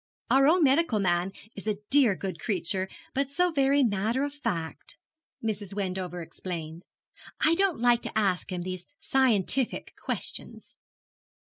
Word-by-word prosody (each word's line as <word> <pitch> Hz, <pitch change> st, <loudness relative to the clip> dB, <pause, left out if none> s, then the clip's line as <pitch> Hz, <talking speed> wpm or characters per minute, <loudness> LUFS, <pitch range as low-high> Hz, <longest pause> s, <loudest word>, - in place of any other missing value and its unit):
'Our 270 Hz, +1 st, +6 dB
own 340 Hz, +2 st, +5 dB
medical 275 Hz, -4 st, +3 dB
man 180 Hz, -1 st, +1 dB, 0.2 s
is 200 Hz, -, -7 dB
a 210 Hz, -2 st, 0 dB
dear 265 Hz, -8 st, +5 dB
good 185 Hz, -3 st, -5 dB
creature, 190 Hz, 0 st, +1 dB, 0.2 s
but 275 Hz, 0 st, 0 dB
so 355 Hz, +5 st, +2 dB
very 280 Hz, -1 st, +3 dB
matter 225 Hz, +4 st, +1 dB
of 285 Hz, 0 st, -3 dB
fact,' 200 Hz, -, -4 dB, 0.5 s
Mrs. 205 Hz, -3 st, -3 dB
Wendover 185 Hz, -3 st, -3 dB
explained; 165 Hz, -1 st, -6 dB, 0.6 s
'I 315 Hz, -, +5 dB
don't 375 Hz, -5 st, +1 dB
like 240 Hz, 0 st, +4 dB
to -, -, -5 dB
ask 195 Hz, -3 st, +1 dB
him 180 Hz, -1 st, -3 dB
these 185 Hz, -1 st, -6 dB
scientific 260 Hz, -1 st, +1 dB
questions.' -, -, -4 dB
215 Hz, 140 wpm, -28 LUFS, 185-275 Hz, 0.6 s, Our